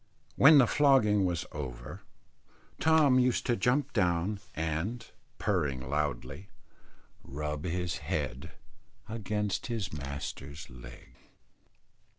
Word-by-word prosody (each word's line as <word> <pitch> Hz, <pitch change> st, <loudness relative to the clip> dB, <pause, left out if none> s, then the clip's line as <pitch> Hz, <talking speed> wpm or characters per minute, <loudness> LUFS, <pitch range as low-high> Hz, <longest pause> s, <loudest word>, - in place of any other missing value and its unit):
When 150 Hz, +2 st, +8 dB
the 135 Hz, -, +7 dB
flogging 110 Hz, -8 st, +4 dB
was 85 Hz, -2 st, -1 dB
over, 60 Hz, -5 st, -7 dB, 0.8 s
Tom 155 Hz, -5 st, +5 dB
used 125 Hz, -1 st, +1 dB
to 120 Hz, -, +2 dB
jump 130 Hz, +7 st, +1 dB
down 90 Hz, 0 st, +1 dB, 0.2 s
and, 80 Hz, +10 st, -2 dB, 0.3 s
purring 75 Hz, -10 st, -1 dB
loudly, 75 Hz, +3 st, -3 dB, 0.7 s
rub 75 Hz, +2 st, -5 dB
his 90 Hz, 0 st, -2 dB
head 65 Hz, -, -3 dB, 0.6 s
against 105 Hz, -2 st, -2 dB
his 110 Hz, -8 st, -3 dB
master's 70 Hz, 0 st, -6 dB
leg. -, -, -13 dB
90 Hz, 100 wpm, -30 LUFS, 75-115 Hz, 0.8 s, When